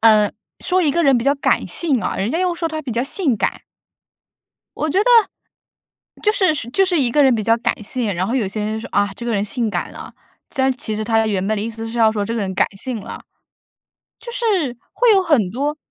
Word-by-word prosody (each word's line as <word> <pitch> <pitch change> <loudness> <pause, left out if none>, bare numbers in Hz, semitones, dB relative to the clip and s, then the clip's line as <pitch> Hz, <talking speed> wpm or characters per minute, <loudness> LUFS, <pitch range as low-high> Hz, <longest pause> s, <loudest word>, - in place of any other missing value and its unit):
嗯， 215 -2 +5 0.3
说 370 0 +2
一 300 -6 +2
个 340 - +1
人 275 -5 +4
比 230 - -4
较 280 +1 +3
感 280 - +1
性 290 -8 0
啊， - - -2
人 200 +4 -1
家 325 - -1
又 365 -1 0
说 335 -1 -2
他 315 -1 -4
比 265 -6 -5
较 235 - 0
性 280 - +1
感。 - - -2 1.1
我 310 - -1
觉 315 - +1
得 - - +2 1.1
就 425 - +3
是 375 -6 +3
是 240 - -5
就 385 +8 +3
是 360 -3 +1
一 250 -3 +3
个 290 +5 +3
人 265 -3 +5
比 215 - -1
较 230 +2 +3
感 235 -1 -1
性， 220 0 -2
然 180 +2 -1
后 235 - -2
有 235 -6 +1
些 210 +2 -4
人 215 +1 -2
就 - - -6
说： - - -8
“啊， 205 0 +2
这 235 - -8
个 235 - -1
人 200 -2 0
性 220 +1 -2
感 - - -3
了”。 - - -10 0.4
但 265 -1 +2
是 - - -13
其 215 -2 -3
实 215 - -3
他 225 0 +2
原 195 -3 -1
本 215 +1 0
的 205 - -2
意 225 - -3
思 225 0 -7
是 230 +1 -5
要 220 -1 +5
说 210 -2 -2
这 230 +3 -3
个 230 - -2
人 190 -2 -3
感 - - +3
性 240 +2 -4
了。 - - -8 1.0
就 475 +1 -8
是 390 - 0 0.2
会 485 -2 +4
有 390 -2 +4
很 290 - +2
多 285 +7 -2
240 Hz, 275 characters per minute, -19 LUFS, 220-310 Hz, 1.1 s, 嗯